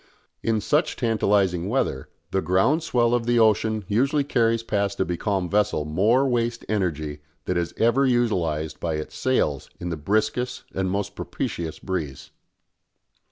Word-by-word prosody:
In 110 -2 0
such - - +1
tantalising 100 -5 +1
weather 105 - -1 0.2
the 95 - +1
"ground 95 - +2
swell" 120 -6 +1
of 120 -1 0
the 120 0 +3
ocean 110 -1 +3
usually 135 +7 +2
carries 115 -4 +1
past 100 -3 -1
a 95 - +2
becalmed 90 0 -2
vessel 100 -7 +1
more 105 - +3
waste 120 -1 -1
energy 80 -8 -2 0.3
than 90 - -1
is 85 -1 -1
ever 120 +4 +3
utilised 90 -11 0
by 80 -2 -2
its 75 0 -6
sails 75 - 0
in 90 - -4
the 85 - -3
briskest 110 +9 -1
and 95 -1 -1
most 100 +1 -2
propitious 80 -2 -4
breeze. 80 -8 -5
100 Hz, 150 wpm, -24 LUFS, 85-115 Hz, 0.3 s, the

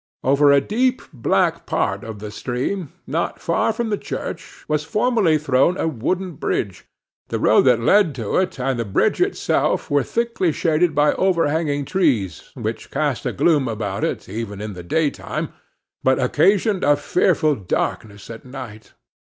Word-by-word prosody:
Over 140 +2 +4
a 140 - +6
deep 250 - 0
black 120 -5 0
part - - -1
of 110 -2 -7
the 105 +1 -7
stream, 130 - -3
not 160 +5 -2
far 165 +6 +1
from 225 0 -3
the 205 - 0
church, 165 - -7
was 150 -1 0
formerly 210 -2 +2
thrown 145 +4 +2
a - - 0
wooden 175 +7 -2
bridge; 95 -5 -2 0.4
the - - -2
road - - +4
that 125 -3 +5
led 165 - +3
to 115 -5 -2
it, 185 -5 0
and 130 -1 -1
the - - 0
bridge 100 -4 +1
itself, - - 0
were 145 0 +4
thickly 230 - 0
shaded 160 +1 +1
by 150 +1 +4
overhanging 160 -5 +1
trees, 130 - 0
which - - -5
cast - - -1
a - - 0
gloom 150 -6 +2
about 105 -3 -3
it, - - -2
even 105 0 -5
in 105 0 -5
the 90 - -8
daytime; 145 - -2 0.5
but 130 0 +3
occasioned 195 - +2
a 145 0 +5
fearful 150 +1 +2
darkness 100 0 -3
at 115 - -9
night. 125 -5 -10
145 Hz, 160 wpm, -21 LUFS, 115-175 Hz, 0.5 s, a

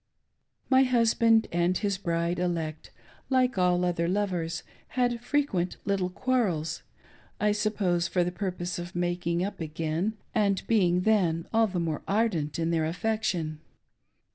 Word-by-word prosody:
My 260 0 +5
husband 230 -3 +4
and 175 +1 +2
his 200 -3 -1
bride 170 -1 -1
elect, 165 -3 -2 0.4
like 255 -5 +2
all 180 0 +3
other 170 -1 0
lovers, 180 -4 -1 0.3
had 240 -1 +1
frequent 245 -11 0
little 195 -2 0
quarrels 185 -8 0 0.3
— - - -29
I 210 0 +3
suppose 200 -5 0
for 180 -1 +1
the 175 - -2
purpose 180 -2 -3
of 175 +1 -7
making 175 0 0
up 205 - -6
again, 165 +6 -2 0.2
and 200 -4 +1
being 180 -6 +3
then 180 -6 +2
all 225 0 +4
the 185 -3 -3
more 160 -3 -2
ardent 195 -9 0
in 165 0 0
their 160 -2 +1
affection. 175 -4 -1
180 Hz, 140 wpm, -28 LUFS, 170-215 Hz, 0.4 s, My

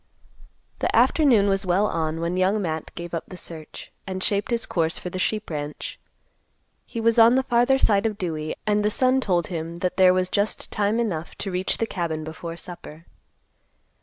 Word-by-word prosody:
The - - 0
afternoon 245 -10 +4
was 195 -1 +1
well 190 +2 +2
on 165 -4 -1
when 170 +1 -1
Young 190 +3 +2
Matt 160 -5 -3
gave 170 0 -7
up 165 - -3
the 185 - -9
search, 160 -3 -9 0.2
and 185 0 -3
shaped 205 +1 +1
his 235 -1 0
course 165 -1 0
for 180 - -6
the 185 - -4
sheep 215 0 -1
ranch. 150 -1 -5 0.9
He 230 - -5
was 230 +1 +3
on 230 +2 +7
the 265 - +3
farther 245 +1 +3
side 210 -4 +3
of 215 -2 -4
Dewey, 155 -5 -3
and 210 0 +2
the 210 - +3
sun 255 +4 +2
told 175 -7 +1
him 165 -1 -4
that 180 - -1
there 185 -1 +7
was 185 0 +1
just 205 +3 -1
time 210 +2 +1
enough 175 -9 -2
to 195 - -4
reach 185 +1 0
the 225 - 0
cabin 170 -6 -3
before 165 +2 -7
supper. 165 -1 -10
185 Hz, 195 wpm, -24 LUFS, 165-215 Hz, 0.9 s, on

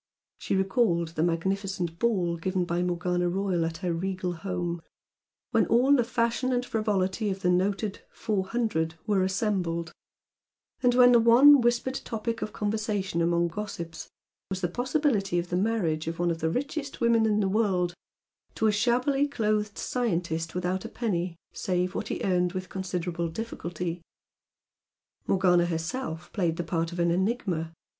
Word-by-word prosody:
She - - -1
recalled 190 -4 +2
the 160 -1 -3
magnificent 175 0 -1
ball 185 -8 +1
given 180 +2 -1
by 175 0 -1
Morgana 180 0 0
Royal 185 -2 0
at 165 0 -3
her 175 - +1
regal 185 +1 -2
home, 175 -1 -3 0.7
when - - +3
all 255 +5 +5
the 245 - +3
fashion 235 +2 0
and 245 0 0
frivolity 210 -2 0
of 195 0 -4
the 180 - +3
noted 195 +3 0
"Four 205 -4 -2
Hundred" 195 -9 -1
were 205 -3 +2
assembled, 185 -4 -1 0.9
and 245 -1 +3
when 245 0 +7
the 240 - +7
one 255 +5 +7
whispered 240 +2 0
topic 230 0 -3
of - - -3
conversation 205 -4 -1
among 170 0 +2
gossips 170 -4 -6 0.4
was 190 -1 -3
the 175 - +1
possibility 245 - 0
of 175 0 -2
the 175 - -1
marriage 180 -6 0
of 165 0 -3
one 175 0 +1
of 165 - -3
the 160 - 0
richest 280 - -3
women 230 -2 +3
in 210 -1 +2
the 200 - +2
world 190 -4 +1 0.6
to 220 - 0
a 215 - +5
shabbily 250 +6 +2
clothed 215 -5 -1
scientist 170 -9 -2
without 180 +1 -1
a - - -6
penny, 180 -7 -2 0.2
save 180 0 -1
what - - -3
he - - -3
earned 180 -2 +1
with 185 -1 -5
considerable 180 -2 -3
difficulty. 175 -3 -5 1.3
Morgana 180 -2 +3
herself 170 +1 -4
played 170 -5 0
the 175 - -1
part 165 0 -1
of 175 - -7
an 170 0 +2
enigma. 185 -4 -1
190 Hz, 160 wpm, -27 LUFS, 175-225 Hz, 1.3 s, when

